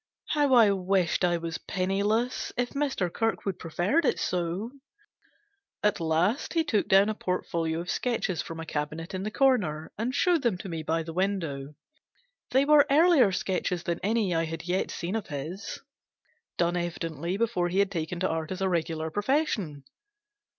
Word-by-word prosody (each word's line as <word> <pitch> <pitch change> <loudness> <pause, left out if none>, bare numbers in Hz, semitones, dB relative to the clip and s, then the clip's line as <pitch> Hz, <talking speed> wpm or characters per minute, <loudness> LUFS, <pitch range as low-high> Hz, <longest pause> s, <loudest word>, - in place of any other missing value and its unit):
How 290 -3 +3
I 225 -4 +7
wished 190 -2 +1
I 175 -1 +3
was 165 -1 -4
penniless 205 +6 -1
if 245 0 0
Mr. 275 -12 -1
Kirkwood 225 -4 -1
preferred 180 - +1
it - - +2
so! 180 +6 -2 1.1
At 210 - +2
last 170 - 0
he 325 - +3
took 215 -9 0
down 195 +1 +6
a 215 - 0
portfolio 170 -4 -2
of 175 - -4
sketches 225 -8 -1
from 165 0 -7
a 165 - -5
cabinet 155 +3 -4
in 185 - -3
the 210 - -2
corner, 205 - +1
and 245 +4 -1
showed 350 -2 +3
them 235 -8 +1
to 195 +1 -7
me 165 -2 -3
by 160 +1 -1
the 165 0 -7
window. 165 -7 -2 0.7
They 265 +2 +3
were 295 -1 +6
earlier 295 - +5
sketches 180 -1 -1
than 170 -2 -2
any 210 -2 +1
I 165 0 +1
had 160 0 -5
yet 180 +2 0
seen 180 +5 -4
of 220 - -3
his 155 +7 -6 0.8
done 175 0 +1
evidently 170 0 -3
before 215 -6 0
he 185 - -2
had 200 0 +3
taken 170 -1 -3
to 185 - +2
art 160 -1 -3
as 185 - -4
a 190 - +2
regular 160 -2 -1
profession. 205 - 0
185 Hz, 170 wpm, -28 LUFS, 165-225 Hz, 1.1 s, I